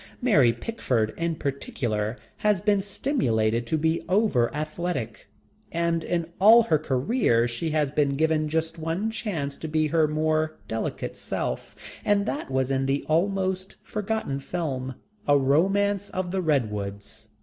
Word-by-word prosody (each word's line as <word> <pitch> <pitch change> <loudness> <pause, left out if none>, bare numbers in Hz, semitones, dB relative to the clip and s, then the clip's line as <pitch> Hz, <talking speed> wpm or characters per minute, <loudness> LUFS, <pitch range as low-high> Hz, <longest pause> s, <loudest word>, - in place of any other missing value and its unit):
Mary 155 - +5
Pickford 120 - -1
in 165 -1 -1
particular 120 -6 -2 0.2
has 210 -3 +2
been 205 0 +2
stimulated 120 - 0
to 160 - +1
be 160 +2 +1
over 185 - +3
athletic, 155 -5 -4 0.4
and 170 -1 0
in 170 -1 -1
all 225 +4 +8
her 160 -9 +2
career 130 - +2
she 120 +8 -3
has 150 -3 +1
been 140 -2 +1
given 155 0 +1
just 160 +1 -1
one 165 +7 -1
chance 165 -11 -3
to 160 - -5
be 155 0 +1
her 160 0 +3
more 155 +1 0
delicate 110 0 -3
self, - - -4 0.3
and 205 -1 +2
that 280 - -3
was 130 0 0
in 135 0 +1
the 135 +1 0
almost 190 +3 0
forgotten 210 -9 -2
film: 135 -5 -3 0.3
A 145 0 +6
Romance 195 +9 +2
of 185 -1 -3
the 190 0 0
Redwoods. 105 - -2
155 Hz, 145 wpm, -26 LUFS, 135-190 Hz, 0.4 s, all